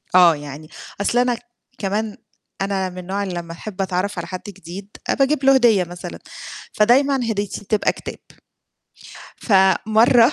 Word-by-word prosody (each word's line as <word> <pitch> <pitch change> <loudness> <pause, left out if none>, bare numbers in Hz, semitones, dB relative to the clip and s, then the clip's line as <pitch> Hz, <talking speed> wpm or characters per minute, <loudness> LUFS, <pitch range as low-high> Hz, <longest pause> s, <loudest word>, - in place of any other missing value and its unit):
آه، 175 -3 +7
يعني 145 +1 -9 0.3
أصل 235 +4 +1
أنا 245 -1 +2
ك - - -11 0.4
كمان 210 +2 -2 0.4
أنا 195 -1 0
من 180 0 -9
نوع 200 +1 -1
اللي 190 - -4
لمّا 170 -1 -5
أحب 195 +2 -6
أتعرف 190 +1 -1
على 170 0 -4
حد 185 -1 -6
جديد 195 +1 -9 0.2
آآ - - +4
باجيب 275 0 +1
له 270 0 +6
هدية 230 -7 +5
مثلًا، 175 0 -8 0.5
فدايمًا 250 +2 +3
هديتي 205 -2 -3
بتبقى 215 +1 +1
كتاب. - - -8 1.2
فمرّة 220 +4 +4
200 Hz, 150 wpm, -21 LUFS, 180-230 Hz, 1.2 s, آه